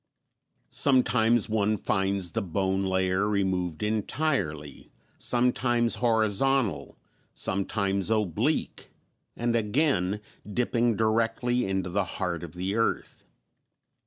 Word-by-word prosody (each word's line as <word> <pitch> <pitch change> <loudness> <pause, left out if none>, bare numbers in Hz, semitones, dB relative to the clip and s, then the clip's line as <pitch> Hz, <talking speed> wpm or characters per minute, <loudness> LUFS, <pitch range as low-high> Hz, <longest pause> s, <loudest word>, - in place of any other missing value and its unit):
Sometimes 120 -4 +3
one 110 -1 +1
finds 95 -3 -1
the 115 - -1
bone 95 +1 -1
layer 95 +1 +1
removed 95 -3 -1
entirely, 105 - -2 0.3
sometimes 120 -1 +2
horizontal, 115 - +1 0.4
sometimes 100 0 -1
oblique, 105 -7 -1 0.5
and 120 0 0
again 105 - +1 0.3
dipping 120 0 +1
directly 115 +3 +1
into 95 -2 -2
the 100 +2 +1
heart 85 -2 -2
of 85 -3 -8
the 95 +2 -2
earth. 115 0 -2
105 Hz, 95 wpm, -27 LUFS, 95-120 Hz, 0.5 s, Sometimes